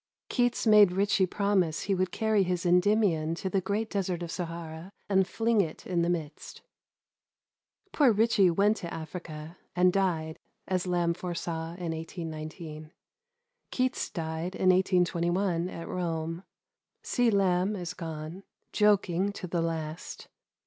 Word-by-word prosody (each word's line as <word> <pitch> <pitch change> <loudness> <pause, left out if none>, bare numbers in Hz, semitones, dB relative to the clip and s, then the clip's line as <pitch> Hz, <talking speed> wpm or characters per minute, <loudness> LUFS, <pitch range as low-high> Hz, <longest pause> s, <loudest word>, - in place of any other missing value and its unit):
Keats 245 -2 +1
made 210 -4 +7
Ritchie 200 0 +2
promise 190 -5 +1
he 200 - 0
would 185 -1 0
carry 220 -2 +2
his 180 -2 -1
Endymion 180 -3 +3
to 190 +2 -4
the 195 - +1
great 205 +4 -1
desert 185 -4 -2
of 170 - -5
Sahara, 165 0 -6 0.2
and 190 -2 +3
fling 225 0 +2
it 160 -5 -5
in 175 -2 0
the 170 - +1
midst. 160 -4 -5 1.3
Poor 280 -5 +5
Ritchie 215 -3 +4
went 205 +5 +3
to 170 -2 -6
Africa, 160 0 -7 0.2
and 180 0 +4
died, 165 -5 0 0.3
as 185 -1 -1
Lamb 175 -1 +1
foresaw 170 -1 -4
in 175 -2 -4
1819. 160 -1 -7 0.8
Keats 255 0 -1
died 165 +1 -4
in 185 - +2
1821, 180 -1 +2
at 165 - -7
Rome. 165 0 -3 0.6
C. 245 -2 +2
Lamb 195 -1 +2
is 180 -2 -5
gone, 160 +1 -6 0.3
joking 200 -2 +3
to 195 - -6
the 175 -1 -1
last. 160 -1 -4
180 Hz, 135 wpm, -29 LUFS, 165-195 Hz, 1.3 s, made